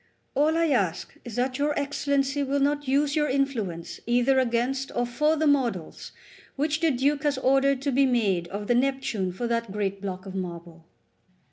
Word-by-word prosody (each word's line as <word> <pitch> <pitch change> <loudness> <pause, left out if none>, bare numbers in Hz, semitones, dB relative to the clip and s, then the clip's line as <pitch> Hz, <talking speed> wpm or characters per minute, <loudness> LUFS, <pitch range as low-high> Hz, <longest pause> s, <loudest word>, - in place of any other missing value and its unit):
All 310 +3 +2
I 330 -1 +2
ask 190 - 0
is 235 -3 -8
that 255 +2 -1
your 295 +1 0
Excellency 280 0 0
will 280 +1 0
not 290 0 0
use 285 +2 +2
your 295 -1 +1
influence 230 -12 -2
either 245 +3 +3
against 255 +2 0
or 245 - +1
for 300 +6 +1
the 315 0 0
models 245 - 0 0.4
which 295 +2 0
the 330 0 +3
Duke 280 +2 +1
has 290 -3 0
ordered 270 +1 +2
to 280 - 0
be 270 +1 +3
made 200 -9 +1
of 200 +3 -5
the 245 - +2
Neptune 245 -7 0
for 215 +7 -4
that 230 -2 -1
great 200 -1 -2
block 190 -1 -5
of 190 - -7
marble." 170 -3 -7
260 Hz, 180 wpm, -26 LUFS, 205-280 Hz, 0.4 s, either